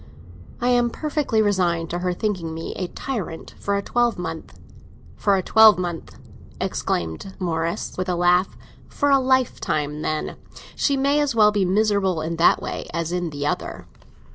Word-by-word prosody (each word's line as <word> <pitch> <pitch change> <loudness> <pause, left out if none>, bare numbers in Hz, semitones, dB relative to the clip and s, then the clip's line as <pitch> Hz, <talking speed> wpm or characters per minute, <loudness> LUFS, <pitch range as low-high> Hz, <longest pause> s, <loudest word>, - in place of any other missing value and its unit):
"I 245 - +1
am 245 -1 +3
perfectly 290 -5 0
resigned 175 -5 0
to 175 - -2
her 180 0 -1
thinking 175 -4 -3
me 165 - -5
a 180 - -3
tyrant 190 -6 -5
for 200 - -1
a 200 - -3
twelvemonth." 180 -10 -2 0.6
"For 200 -1 +2
a 185 - -1
twelvemonth!" 185 -6 +4 0.4
exclaimed 85 - -3
Morris, 165 -2 -2
with 185 0 -2
a 180 - +1
laugh. 175 +2 +2 0.3
"For 285 -1 0
a 275 - +6
lifetime, 235 - 0
then! 155 0 -3 0.4
She 280 -2 +1
may 280 +2 +2
as 290 -4 0
well 210 -2 +6
be 205 -2 +1
miserable 195 -2 +1
in 165 +1 -3
that 165 - +5
way - - -5
as 170 -1 -2
in 175 -1 -1
the 145 -1 -4
other." - - -3
185 Hz, 160 wpm, -23 LUFS, 170-225 Hz, 0.6 s, a